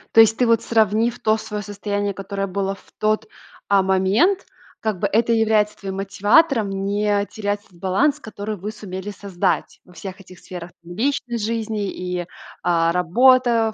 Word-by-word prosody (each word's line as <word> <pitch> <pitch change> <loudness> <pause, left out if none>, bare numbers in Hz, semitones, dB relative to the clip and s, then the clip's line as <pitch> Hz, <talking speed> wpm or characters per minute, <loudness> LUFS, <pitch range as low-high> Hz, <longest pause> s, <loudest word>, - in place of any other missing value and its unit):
То 225 - +8
есть, 225 0 +7
ты 250 - +3
вот, 230 -1 +3
сравнив 225 +1 +2
то 215 0 +2
свое 210 -1 -5
состояние, 205 0 -3
которое 195 +1 -4
было 195 +1 -2
в - - -22
тот, 215 0 +1 0.4
а, 200 -1 +5
момент, 190 - +2 0.4
как 215 -4 -1
бы, 200 - +1
это 225 +4 +2
является 220 -2 +2
твоим 195 -1 -5
мотиватором 210 +5 +3
не 200 +1 0
терять 205 -1 -3
этот 175 -3 -22
баланс, 270 - +1
который 215 -2 -6
вы 200 +4 -5
сумели 200 -1 -6
создать 195 -3 -2
во 180 - -18
всех 195 +1 -8
этих 185 -1 -14
сферах, 175 -1 -9
там, 175 +1 -10
личной 245 +1 -1
жизни 220 -2 -2
и, 180 -1 -4 0.4
а, 170 -1 +2
работа, 230 +5 +4
205 Hz, 165 wpm, -21 LUFS, 195-225 Hz, 0.4 s, То